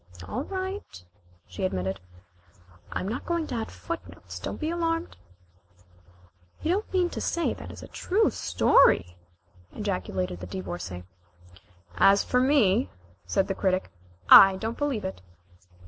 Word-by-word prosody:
"All 255 Hz, +5 st, -3 dB
right," 380 Hz, -, -5 dB, 0.4 s
she 90 Hz, 0 st, -7 dB
admitted. 95 Hz, 0 st, -2 dB, 0.9 s
"I -, -, -2 dB
am 185 Hz, -, -4 dB
not 225 Hz, +5 st, -3 dB
going 340 Hz, -2 st, -1 dB
to 270 Hz, -, -6 dB
add 225 Hz, -2 st, -3 dB
footnotes, 335 Hz, 0 st, -8 dB
don't -, -, -5 dB
be 310 Hz, +1 st, -2 dB
alarmed." 330 Hz, 0 st, -2 dB, 1.5 s
"You 320 Hz, -, +1 dB
don't 405 Hz, +4 st, -1 dB
mean 360 Hz, -2 st, +1 dB
to -, -, -5 dB
say 340 Hz, -, 0 dB
that -, -, -10 dB
is -, -, -10 dB
a -, -, -9 dB
true 420 Hz, +4 st, +1 dB
story?" 85 Hz, 0 st, +3 dB, 0.6 s
ejaculated 90 Hz, -1 st, -3 dB
the 90 Hz, -, -7 dB
Divorcée. 90 Hz, 0 st, -6 dB, 0.9 s
"As 195 Hz, -, +5 dB
for 250 Hz, -, +1 dB
me," 255 Hz, -5 st, +3 dB, 0.4 s
said 195 Hz, -, +1 dB
the 195 Hz, -, -1 dB
Critic, 185 Hz, -1 st, -1 dB, 0.4 s
"I 195 Hz, -1 st, +10 dB
don't 225 Hz, +4 st, -4 dB
believe 275 Hz, -9 st, -2 dB
it." 190 Hz, -, -5 dB
220 Hz, 140 wpm, -27 LUFS, -, 1.5 s, I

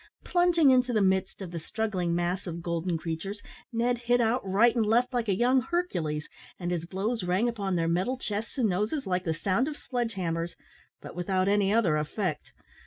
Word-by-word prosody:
Plunging 350 Hz, -5 st, +4 dB
into 250 Hz, -1 st, +3 dB
the 215 Hz, -, +3 dB
midst 190 Hz, +1 st, 0 dB
of 175 Hz, -, -7 dB
the 170 Hz, -, -4 dB
struggling 180 Hz, -2 st, -2 dB
mass 175 Hz, +2 st, -1 dB
of 170 Hz, -1 st, -5 dB
golden 170 Hz, 0 st, -1 dB
creatures, 165 Hz, +6 st, -4 dB, 0.3 s
Ned 240 Hz, +1 st, +1 dB
hit 245 Hz, +1 st, +2 dB
out 235 Hz, +2 st, +2 dB
right 205 Hz, +6 st, +3 dB
and 230 Hz, -, +3 dB
left 235 Hz, +4 st, +2 dB
like 240 Hz, -2 st, 0 dB
a 195 Hz, -, +3 dB
young 250 Hz, +5 st, +3 dB
Hercules, 180 Hz, -, -2 dB, 0.3 s
and 175 Hz, -1 st, -2 dB
his 170 Hz, -1 st, -2 dB
blows 205 Hz, +4 st, -2 dB
rang 185 Hz, +6 st, +1 dB
upon 200 Hz, -5 st, -1 dB
their 165 Hz, -1 st, +1 dB
metal 185 Hz, +10 st, 0 dB
chests 220 Hz, +1 st, -4 dB
and 245 Hz, -4 st, +3 dB
noses 210 Hz, -, -1 dB
like 185 Hz, -1 st, -1 dB
the 160 Hz, -2 st, 0 dB
sound 195 Hz, -, +1 dB
of 300 Hz, -1 st, -5 dB
sledge 240 Hz, -3 st, -3 dB
hammers, 170 Hz, -2 st, -2 dB, 0.5 s
but -, -, -9 dB
without 185 Hz, +1 st, 0 dB
any 200 Hz, -1 st, +3 dB
other 200 Hz, -9 st, +3 dB
effect. 155 Hz, +2 st, -3 dB
200 Hz, 195 wpm, -28 LUFS, 175-240 Hz, 0.5 s, Plunging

